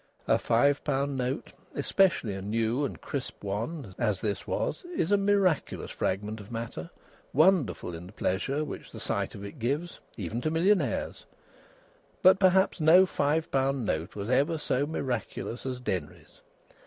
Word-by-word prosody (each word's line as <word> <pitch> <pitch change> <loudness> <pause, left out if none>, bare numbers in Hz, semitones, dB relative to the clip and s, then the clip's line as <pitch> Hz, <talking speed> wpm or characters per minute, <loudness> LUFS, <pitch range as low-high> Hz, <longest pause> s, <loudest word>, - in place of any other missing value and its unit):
A - - +4
five 140 +5 +3
pound 140 -1 0
note 130 +1 -3 0.2
especially 170 - +2
a 95 - -5
new 115 +6 0
and - - -5
crisp 140 -6 -5
one, 110 - -4
as 105 -5 +1
this 105 0 -3
was - - -2
is 180 - 0
a - - +7
miraculous 200 -4 +1
fragment 105 +3 -2
of 105 +2 -11
matter, 115 -8 -5 0.4
wonderful 155 - +3
in 85 +2 -8
the - - -12
pleasure 120 +10 -1
which 145 - -8
the - - -9
sight - - -2
of 100 - -7
it 100 - -9
gives, 145 +9 -2 0.2
even 110 +3 -3
to 155 - 0
millionaires; 165 - +1 1.0
but 190 +1 +7
perhaps 190 -1 +4
no 170 +5 +7
five 155 -2 0
pound 135 -2 +1
note 80 -1 -2
was 100 0 -4
ever 145 +5 +3
so 145 -2 0
miraculous 130 -4 -3
as 130 -1 -3
Denry's. 95 -11 -5
135 Hz, 155 wpm, -29 LUFS, 105-160 Hz, 1.0 s, a